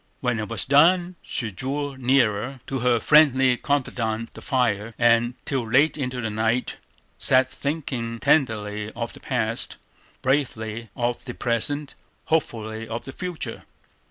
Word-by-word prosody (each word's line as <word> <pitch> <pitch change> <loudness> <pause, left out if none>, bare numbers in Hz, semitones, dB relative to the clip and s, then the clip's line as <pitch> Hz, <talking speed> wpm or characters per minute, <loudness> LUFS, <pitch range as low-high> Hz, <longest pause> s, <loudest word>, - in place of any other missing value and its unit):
When 125 -3 0
it 105 - -4
was 115 - 0
done, 175 +6 +4
she 115 -2 -4
drew 140 +6 -3
nearer, 125 -1 +1
to 135 - -3
her 120 -1 +3
friendly 135 -3 +5
confidante 115 -5 -2
the - - -11
fire, 115 -5 0
and 120 +1 +3
till 130 -6 -2
late 145 +7 +4
into 125 -4 -3
the 110 -2 -2
night 110 +3 0 0.4
sat 130 0 +4
thinking 130 -4 -3
tenderly 105 -7 +1
of 115 0 -4
the - - -11
past, 115 -3 -1 0.5
bravely 115 -5 -1
of 120 0 -1
the 120 - -6
present, 140 +5 -1 0.3
hopefully 115 -8 -1
of 115 +1 -5
the 135 - -6
future. 180 -3 -5
125 Hz, 140 wpm, -24 LUFS, 115-135 Hz, 0.5 s, friendly